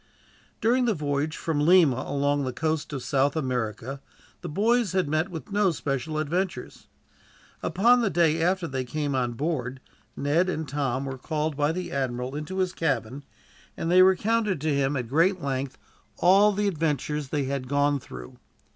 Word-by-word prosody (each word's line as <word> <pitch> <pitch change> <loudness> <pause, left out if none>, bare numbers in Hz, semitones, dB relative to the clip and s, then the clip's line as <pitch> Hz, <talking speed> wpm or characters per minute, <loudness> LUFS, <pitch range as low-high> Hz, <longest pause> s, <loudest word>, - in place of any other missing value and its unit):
During 245 +3 +3
the 225 -4 +1
voyage 150 0 -2
from 160 -3 -2
Lima 155 -7 +5
along 145 0 0
the 130 - -2
coast 155 +3 -2
of 135 -4 -4
South 140 +2 +1
America, 130 -2 -3 0.4
the - - -6
boys 220 +4 +1
had 185 -4 +1
met 155 +5 0
with 170 +3 -8
no 205 -1 +3
special 155 -1 -3
adventures. 165 -1 -3 0.7
Upon 235 +9 +3
the 220 - +1
day 165 -2 +2
after 180 +1 +1
they 130 -3 -3
came 145 +3 -3
on 125 -2 0
board 130 -2 -3
ship, - - -33 0.2
Ned 160 +6 +1
and 160 -4 -3
Tom 135 -2 -2
were 135 -1 -5
called 155 +2 -2
by 145 +1 +1
the 180 +1 -4
admiral 130 -1 -2
into 155 +6 -5
his 185 -1 0
cabin, 135 -4 -2 0.5
and 165 - -2
there 185 +1 +7
recounted 205 0 +2
to 155 -1 0
him, 140 0 +1
at 125 -2 -3
great 170 - +2
length, 135 -2 -3 0.4
all 195 +4 +5
the 205 +1 0
adventures 150 -4 -1
that 150 - -2
they 145 - +1
had 135 -1 -3
gone 145 +1 +2
through. 60 - -11
150 Hz, 175 wpm, -26 LUFS, 135-180 Hz, 0.7 s, there